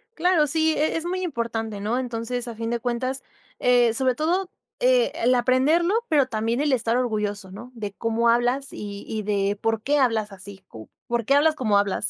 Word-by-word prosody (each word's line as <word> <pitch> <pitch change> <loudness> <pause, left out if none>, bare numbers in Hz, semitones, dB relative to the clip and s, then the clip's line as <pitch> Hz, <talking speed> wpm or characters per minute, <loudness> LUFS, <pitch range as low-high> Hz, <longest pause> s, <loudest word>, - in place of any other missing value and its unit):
Claro. 335 -3 +3
Sí, 320 +2 +2
e 310 +2 +1
es 325 - -3
muy 370 +2 -2
importante, 230 - -3
¿no? 225 +5 -1
Entonces, 245 0 -3
a 235 - -6
fin 230 +1 -4
de 235 - 0
cuentas, 255 +3 -2 0.4
eh, 245 -2 +4
sobre 255 +1 +2
todo, 350 +7 0 0.3
eh, - - +3
el 250 +2 +2
aprenderlo, 270 +9 +2 0.2
pero 290 -4 +3
también 225 +2 -1
el 295 -2 +1
estar 235 -1 +1
orgulloso, 210 -5 -2
¿no?, 230 +6 -10
de 210 -3 -5
cómo 230 +1 0
hablas 245 +3 +1
y 200 -1 -7
y 215 -1 -3
de 200 0 0
porqué 225 +6 0
hablas 225 -5 +1
así, 195 0 -12
cu 110 -1 -12 0.2
¿por 235 -2 -1
qué 275 - +3
hablas 310 +2 +4
como 215 -7 +2
hablas? 200 -1 0
240 Hz, 195 wpm, -24 LUFS, 220-280 Hz, 0.4 s, eh